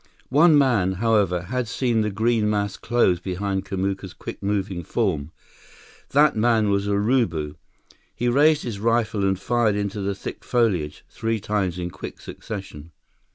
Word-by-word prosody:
One 150 +3 +6
man, 115 -10 +3
however, 100 -4 +1
had 125 +6 -2
seen 115 -1 0
the 105 - 0
green 110 +1 +1
mass 100 -2 -1
close 110 -7 +1
behind 95 +1 -3
Kamuka's 95 -1 -3
quick - - -8
moving 100 -3 -2
form. 85 -7 -1 0.8
That 150 +2 +4
man 110 -2 +2
was 100 0 0
Urubu. 100 - +1 0.6
He 120 - -1
raised 150 +5 +4
his 110 -5 -5
rifle 115 -2 +1
and 95 -1 +1
fired 115 0 +1
into 100 0 -2
the 100 0 -2
thick - - -7
foliage, 100 -12 0
three 115 0 -2
times 100 -4 -1
in 90 0 -4
quick 95 - -8
succession. 95 -8 -8
105 Hz, 150 wpm, -23 LUFS, 95-115 Hz, 0.8 s, One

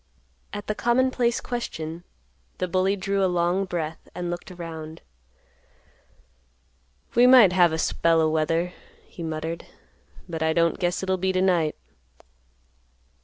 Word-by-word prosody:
At 205 0 -6
the 215 - -1
commonplace 240 +1 +1
question, 170 -9 -5 0.5
the 185 - -1
bully 185 +2 +1
drew 195 0 -1
a 190 - +3
long 175 +2 +1
breath 165 -3 -5
and 175 -1 -3
looked 175 +2 -6
around. 165 -3 -8 2.1
"We 245 +1 +6
might 245 -8 +8
have 175 -2 +5
a 160 - -1
spell 165 0 +2
o' 160 - +3
weather," 165 +3 0 0.3
he - - -12
muttered; 160 +1 -4 0.6
"but 165 -2 -5
I 160 0 +2
don't 170 0 +2
guess 175 0 -1
it'll 190 0 0
be 190 +1 0
t'night." 185 -4 +1
175 Hz, 130 wpm, -25 LUFS, 165-190 Hz, 2.1 s, might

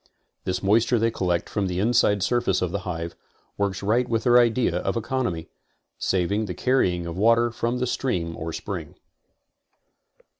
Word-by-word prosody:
This 90 +1 -2
moisture 110 +5 +3
they 115 +1 +2
collect 90 -5 -1
from 100 -2 -1
the 90 -1 -3
inside 105 -1 +3
surface 120 -5 +1
of 90 - -1
the 100 - -2
hive, 85 -1 -4 0.4
works 100 -1 -2
right 110 +5 +2
in - - -10
with 115 -1 +1
their 125 -1 +6
idea 120 -6 +2
of 95 +2 -2
econ 125 +2 -1
omy, 80 -2 -4 0.5
saving 100 +4 0
the 90 - -5
carrying 90 -10 +1
of 85 -1 -5
water 115 +2 +4
from 120 +2 -2
the 125 - 0
stream 90 -10 -2
or 80 +1 -5
spring. - - -6
105 Hz, 175 wpm, -24 LUFS, 90-120 Hz, 0.5 s, their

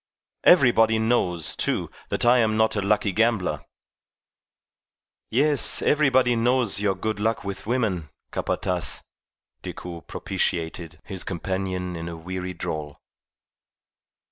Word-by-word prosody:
Everybody 120 -9 +5
knows, 100 - 0
too, - - -1 0.2
that - - -1
I 120 +1 +6
am 110 -2 +2
not 110 0 +2
a 105 - 0
lucky 100 0 +1
gambler." 95 -8 +1 1.7
"Yes, 145 +5 +3
everybody 130 -5 +3
knows 120 -2 +2
of - - -2
your 100 -2 +1
good 110 +2 -3
luck 110 +2 0
with 100 0 -6
women, 110 - -1 0.2
Capataz," 90 -8 -2 0.6
Decoud 85 -2 -8
propitiated 80 0 -3
his 95 -2 -4
companion 95 0 -3
in 85 0 -5
a 85 - -7
weary 90 +2 -5
drawl. 75 -3 -5
100 Hz, 115 wpm, -24 LUFS, 90-115 Hz, 1.7 s, I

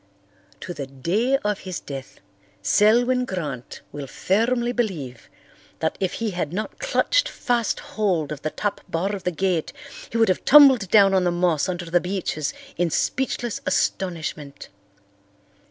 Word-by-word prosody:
To 175 - -5
the 140 -4 -6
day 190 - 0
of 210 -1 0
his 185 -2 -5
death 135 -2 -9 0.4
Selwyn 240 - +4
Grant 150 - -5
will 145 -2 -6
firmly 235 - 0
believe 165 - -3 0.5
that 160 - -1
if 190 -2 -1
he 225 -2 -2
had 175 -5 -3
not 210 +5 -5
clutched - - +1
fast 240 -4 -1
hold 180 -9 -1
of 145 -2 -5
the 155 - -2
top 205 +5 -3
bar 190 +5 -1
of 195 - -9
the 180 - +1
gate 180 -1 -1 0.4
he 230 - -3
would 225 -2 +4
have 185 - 0
tumbled 265 -9 +7
down 195 -1 +6
on 190 -1 +3
the 175 - +2
moss 175 -1 +1
under 175 -1 -3
the 170 +1 +2
beeches 180 -5 -2 0.3
in 175 0 +1
speechless 240 - -1
astonishment. 160 -6 -2
185 Hz, 155 wpm, -23 LUFS, 160-225 Hz, 0.5 s, tumbled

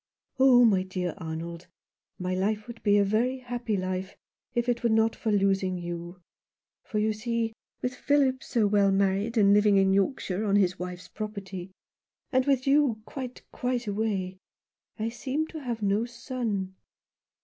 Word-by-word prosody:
" 270 - -45
Oh, 255 -2 +7
my 195 -5 +4
dear 185 -2 -3
Arnold, 165 +1 -6 0.5
my 180 0 -2
life 210 +3 0
would 235 -1 -10
be 205 -1 +4
a 205 - +5
very 235 +6 +1
happy 245 -4 -3
life, 185 0 -3 0.4
if 240 0 +1
it 240 -1 +1
were 235 - +2
not 220 0 +3
for 220 - -2
losing 195 -2 +2
you; 175 +1 -6 0.6
for, 215 - -4
you 215 +1 +2
see, 225 +1 -2 0.3
with 250 - -1
Philip 265 0 +2
so 230 -4 +1
well 200 -1 +4
married 200 +4 +1
and 200 -2 +6
living 205 -1 +5
in 190 0 +4
Yorkshire 200 -1 0
on 200 -2 +2
his 185 -2 +2
wife's 180 0 -6
property, 200 -4 -6 0.6
and 260 0 +2
with 270 -2 +2
you 275 -6 +3
quite, 255 -2 -7
quite 250 -1 -2
away, 200 -3 -2 0.6
I 220 +1 -1
seem 265 +6 -2
to 315 - -7
have 235 -5 -4
no 205 +3 +2
son." 235 -6 -3
215 Hz, 165 wpm, -28 LUFS, 190-240 Hz, 0.6 s, Oh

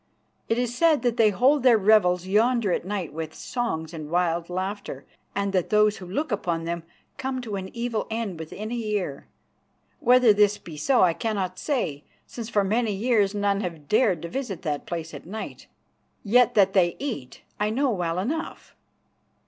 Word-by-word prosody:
It 225 - +2
is 245 -1 -1
said 315 0 +3
that 240 -1 +1
they 220 -2 +5
hold 260 +8 +3
their 245 -3 +6
revels 190 -4 +4
yonder 220 +2 +2
at 175 - -1
night 190 -4 -3
with 160 0 -5
songs 170 -10 -3
and 155 -2 -7
wild 170 0 0
laughter, 185 -6 -4 0.3
and 200 0 -1
that 185 -3 +1
those 210 -1 +3
who 180 - -9
look 275 - -2
upon 170 -5 -1
them 170 +1 -3 0.4
come 265 -1 -2
to 220 -4 -5
an 190 -1 -5
evil 235 -2 -2
end 220 -6 -3
within 205 +7 -6
a - - -2
year. 210 -11 -3 0.7
Whether 245 -2 +6
this 205 0 +3
be 165 - -11
so 245 - +3
I 175 -2 +4
cannot 190 -3 -3
say, 195 - -2 0.2
since 230 -2 -7
for 205 -3 +2
many 220 +2 +1
years 210 -1 +1
none 200 -1 +1
have 165 -6 -6
dared 210 -7 +2
to - - -3
visit 210 -3 -5
that 150 -4 -3
place 165 -2 -5
at - - -9
night. 215 +4 -7 0.6
Yet 240 +3 +4
that 195 -2 +4
they 175 -3 +3
eat 230 - -6 0.2
I 210 0 +1
know 265 +4 +1
well 175 -4 -1
enough." 290 - -4
205 Hz, 180 wpm, -25 LUFS, 175-235 Hz, 0.7 s, their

